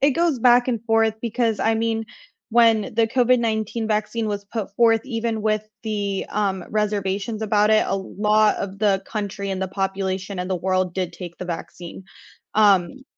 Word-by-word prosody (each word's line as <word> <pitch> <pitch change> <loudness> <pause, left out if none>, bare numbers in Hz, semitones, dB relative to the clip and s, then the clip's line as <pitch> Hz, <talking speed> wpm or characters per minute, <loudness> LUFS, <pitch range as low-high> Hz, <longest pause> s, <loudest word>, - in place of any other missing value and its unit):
it 280 - +4
goes 330 -1 +1
back 245 +1 +5
and 230 -4 -1
forth 225 -1 +2
because, 230 -2 0
I 225 - +2
mean, 225 0 -1 0.5
when 225 -2 +4
the 225 0 +3
COVID-19 230 -2 +1
vaccine 215 +1 -1
was 205 -1 -3
put 200 -1 -5
forth, 225 -1 +4
even 230 -3 -2
with 215 0 0 0.2
the, 205 -3 -2
um, 195 -3 -1
reservations 210 +1 -1
about 210 0 +2
it, 215 - +4
a - - 0
lot 210 +2 +2
of 195 0 -5
the 200 -2 +2
country 200 -2 -4
and 190 -1 -3
the 190 - -2
population 190 0 -3
and 180 +1 -3
the 185 - +1
world 185 0 -1
did 180 -2 -2
take 170 -1 -9
the - - -5
vaccine, 175 +1 -7 0.5
um 205 +4 +3
210 Hz, 175 wpm, -22 LUFS, 195-225 Hz, 0.5 s, back